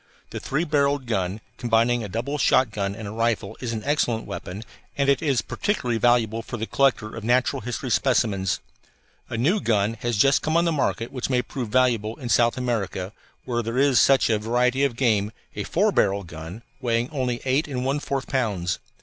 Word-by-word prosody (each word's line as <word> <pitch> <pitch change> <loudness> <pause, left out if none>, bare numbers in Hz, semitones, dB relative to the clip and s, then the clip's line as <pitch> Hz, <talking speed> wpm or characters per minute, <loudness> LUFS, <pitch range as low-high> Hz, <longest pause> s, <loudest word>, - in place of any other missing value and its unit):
The - - -4
three 145 +5 -1
barrelled 145 -3 +1
gun, 100 -2 -2 0.2
combining 120 0 +2
a 105 - -5
double 125 +9 -3
shotgun 105 -8 +2
and 110 -1 -7
a - - -5
rifle, 115 -3 -1
is 120 -3 -3
an 110 -2 -4
excellent 125 -6 0
weapon, 100 0 -6 0.3
and 140 -1 +1
it 140 -2 +3
is 135 -9 +1
particularly 125 - -1
valuable 115 -1 +2
for 120 - -6
the 110 - -3
collector 125 -4 +1
of 115 - -7
natural 125 +3 +2
history 125 +3 -4
specimens. 105 -7 +1 0.7
A 120 - -3
new 165 - +2
gun 105 -1 +1
has 120 -2 -1
just 135 +7 +4
come 155 +2 +1
on 170 - +3
the 170 - +2
market 130 -6 -1
which 130 -1 -3
may 125 -2 +2
prove 125 -5 -5
valuable 115 -3 +2
in 130 -5 -7
South 120 +1 +3
America 105 -6 -2 0.3
where 120 -2 -1
there 115 +2 -4
is 135 -3 +4
such 135 +2 +5
a 110 -2 +1
variety 125 +4 +1
of 135 -4 +1
game, 110 -5 +1 0.2
a - - -3
four - - +1
barrel 100 +1 +2
gun, 80 +6 -9 0.2
weighing 120 -2 0
only 125 -4 -1
eight 135 +4 +1
and 130 -3 -3
one 140 +2 0
fourth 140 -2 -3
pounds. 100 -9 -1
120 Hz, 195 wpm, -24 LUFS, 110-130 Hz, 0.7 s, such